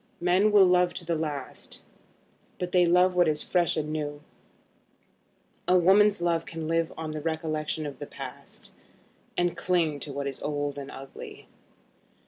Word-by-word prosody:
Men 185 Hz, +4 st, +3 dB
will 205 Hz, -2 st, +7 dB
love 180 Hz, -1 st, +3 dB
to -, -, -6 dB
the 170 Hz, -, 0 dB
last, 150 Hz, -4 st, -5 dB, 0.8 s
but 180 Hz, -1 st, -4 dB
they 180 Hz, -1 st, +4 dB
love 180 Hz, +2 st, +4 dB
what 180 Hz, -1 st, +4 dB
is 150 Hz, -1 st, 0 dB
fresh 175 Hz, -3 st, +1 dB
and 155 Hz, 0 st, -2 dB
new. 145 Hz, -1 st, -4 dB, 1.4 s
A 185 Hz, -, +5 dB
woman's 195 Hz, +1 st, +5 dB
love 170 Hz, -1 st, +1 dB
can 165 Hz, -1 st, -5 dB
live 165 Hz, 0 st, 0 dB
on 160 Hz, -1 st, -4 dB
the 155 Hz, 0 st, -5 dB
recollection 155 Hz, -1 st, -2 dB
of 145 Hz, -2 st, -7 dB
the -, -, -6 dB
past, -, -, -10 dB, 0.7 s
and 175 Hz, 0 st, +1 dB
cling 165 Hz, -5 st, 0 dB
to 145 Hz, -, -6 dB
what 140 Hz, 0 st, -4 dB
is 140 Hz, -1 st, -5 dB
old 145 Hz, -1 st, -2 dB
and 140 Hz, 0 st, -7 dB
ugly. 135 Hz, 0 st, -10 dB
165 Hz, 160 wpm, -27 LUFS, 150-180 Hz, 1.4 s, will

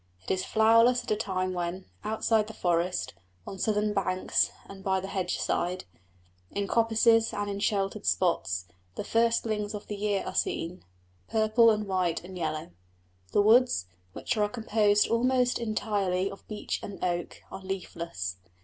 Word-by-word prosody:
It -, -, -4 dB
is 185 Hz, -1 st, 0 dB
flowerless 230 Hz, +3 st, +4 dB
at -, -, -5 dB
a -, -, +4 dB
time 185 Hz, -3 st, -2 dB
when, 175 Hz, +1 st, -3 dB, 0.2 s
outside 220 Hz, 0 st, +1 dB
the 220 Hz, -, -9 dB
forest, 175 Hz, +1 st, 0 dB, 0.3 s
on 195 Hz, -, -7 dB
southern 210 Hz, +1 st, +1 dB
banks 185 Hz, -2 st, +1 dB, 0.2 s
and 195 Hz, -1 st, -11 dB
by 190 Hz, -1 st, +1 dB
the 190 Hz, -, -6 dB
hedge 185 Hz, -2 st, -2 dB
side, 180 Hz, +1 st, -1 dB, 0.6 s
in 200 Hz, 0 st, -2 dB
coppices 225 Hz, 0 st, +3 dB
and 205 Hz, 0 st, -2 dB
all 200 Hz, 0 st, -3 dB
sheltered 200 Hz, 0 st, -1 dB
spots, 95 Hz, -, +1 dB, 0.3 s
the -, -, -3 dB
firstlings 225 Hz, -2 st, +1 dB
of 205 Hz, -, -7 dB
the 210 Hz, -, -5 dB
year 205 Hz, -1 st, 0 dB
are -, -, -4 dB
seen 170 Hz, +2 st, -2 dB, 0.5 s
purple 220 Hz, +1 st, +4 dB
and 210 Hz, -1 st, +1 dB
white 185 Hz, -4 st, 0 dB
and 185 Hz, +1 st, -10 dB
yellow. 155 Hz, -, -3 dB, 0.6 s
The 205 Hz, -, +4 dB
woods, 225 Hz, -, +4 dB, 0.3 s
which 240 Hz, -, -2 dB
are 210 Hz, -1 st, +2 dB
composed 210 Hz, -3 st, +2 dB
almost 250 Hz, +1 st, +2 dB
entirely 200 Hz, -4 st, -1 dB
of 195 Hz, -, -12 dB
beech 210 Hz, -1 st, -3 dB
and 200 Hz, -, -7 dB
oak, 175 Hz, -1 st, -2 dB
are -, -, -7 dB
leafless. 170 Hz, -, -5 dB
205 Hz, 160 wpm, -28 LUFS, 185-220 Hz, 0.6 s, flowerless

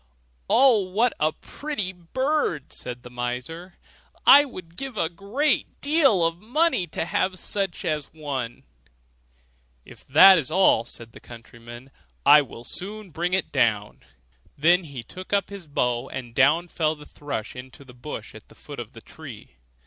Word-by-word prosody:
'Oh, 255 Hz, -3 st, +5 dB
what 205 Hz, +5 st, +1 dB
a 155 Hz, +1 st, +2 dB
pretty 215 Hz, -, -5 dB
bird!' 185 Hz, -, -2 dB
said 125 Hz, -1 st, -6 dB
the 125 Hz, -, -11 dB
miser; 125 Hz, +9 st, -5 dB, 0.5 s
'I 285 Hz, +1 st, +9 dB
would 180 Hz, -10 st, -11 dB
give 270 Hz, -1 st, -6 dB
a 160 Hz, -, 0 dB
great 205 Hz, -, -1 dB
deal 275 Hz, -, +3 dB
of 165 Hz, +1 st, -1 dB
money 245 Hz, -, +1 dB
to -, -, -3 dB
have 185 Hz, +2 st, -1 dB
such 195 Hz, -1 st, -3 dB
a 155 Hz, -3 st, 0 dB
one.' 135 Hz, -5 st, -5 dB, 1.2 s
'If -, -, -15 dB
that's 165 Hz, +1 st, +7 dB
all,' 170 Hz, -9 st, +3 dB
said 115 Hz, -1 st, -9 dB
the -, -, -13 dB
countryman, 120 Hz, +2 st, -13 dB, 0.3 s
'I 150 Hz, +1 st, +8 dB
will 120 Hz, -3 st, -10 dB
soon 200 Hz, -, -7 dB
bring 175 Hz, +4 st, -2 dB
it 190 Hz, -, -2 dB
down.' 105 Hz, -3 st, 0 dB, 0.6 s
Then 175 Hz, +5 st, +4 dB
he 135 Hz, -6 st, -8 dB
took 185 Hz, -, -9 dB
up 200 Hz, -1 st, +1 dB
his 195 Hz, -5 st, -9 dB
bow, 125 Hz, -4 st, -1 dB
and 125 Hz, -3 st, -7 dB
down 155 Hz, +8 st, +3 dB
fell 160 Hz, -2 st, -1 dB
the 150 Hz, -1 st, -14 dB
thrush 140 Hz, -9 st, -6 dB
into 130 Hz, +3 st, -11 dB
the 125 Hz, -, -14 dB
bushes 120 Hz, -, -8 dB
at -, -, -38 dB
the -, -, -18 dB
foot -, -, -10 dB
of -, -, -8 dB
the -, -, -12 dB
tree. -, -, -12 dB
165 Hz, 160 wpm, -24 LUFS, 130-195 Hz, 1.2 s, I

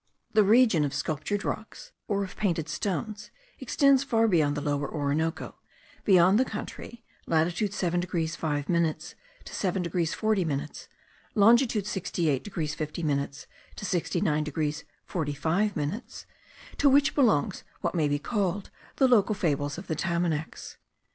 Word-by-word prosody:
The 215 Hz, -1 st, +6 dB
region 220 Hz, -5 st, +5 dB
of 145 Hz, -1 st, -2 dB
sculptured 170 Hz, +7 st, -2 dB
rocks, 220 Hz, 0 st, -5 dB, 0.2 s
or 200 Hz, -1 st, 0 dB
of 190 Hz, -, -8 dB
painted 170 Hz, -7 st, -1 dB
stones, 205 Hz, +5 st, -3 dB, 0.3 s
extends 275 Hz, -2 st, +3 dB
far 225 Hz, -4 st, +2 dB
beyond 155 Hz, -7 st, +2 dB
the -, -, -2 dB
Lower 145 Hz, -1 st, -1 dB
Orinoco, 155 Hz, +2 st, -2 dB, 0.5 s
beyond 190 Hz, +1 st, +5 dB
the -, -, +5 dB
country 235 Hz, -2 st, -7 dB, 0.2 s
(latitude 170 Hz, +5 st, +1 dB
7 175 Hz, -4 st, 0 dB
degrees 165 Hz, -3 st, -2 dB
5 145 Hz, -3 st, -2 dB
minutes 170 Hz, -3 st, 0 dB, 0.3 s
to -, -, -10 dB
7 185 Hz, -1 st, -1 dB
degrees 170 Hz, -1 st, -1 dB
40 215 Hz, -3 st, +1 dB
minutes, 150 Hz, -1 st, -4 dB, 0.5 s
longitude 225 Hz, 0 st, +4 dB
68 165 Hz, -8 st, -1 dB
degrees 165 Hz, -7 st, -3 dB
50 155 Hz, +2 st, -4 dB
minutes 140 Hz, -2 st, -2 dB, 0.3 s
to -, -, -6 dB
69 165 Hz, -4 st, 0 dB
degrees 150 Hz, 0 st, -3 dB, 0.2 s
45 160 Hz, +6 st, -1 dB
minutes) 155 Hz, -, -4 dB, 0.5 s
to 285 Hz, -, +5 dB
which 280 Hz, +1 st, +4 dB
belongs 205 Hz, -, +2 dB, 0.2 s
what -, -, -1 dB
may 160 Hz, -4 st, +1 dB
be 145 Hz, 0 st, +1 dB
called 195 Hz, +2 st, -2 dB, 0.2 s
the 265 Hz, -, +4 dB
local 215 Hz, -4 st, +4 dB
fables 145 Hz, -4 st, -1 dB
of 185 Hz, -, -7 dB
the 160 Hz, -, -2 dB
Tamanacs. 170 Hz, -2 st, -2 dB
175 Hz, 145 wpm, -27 LUFS, 155-210 Hz, 0.5 s, The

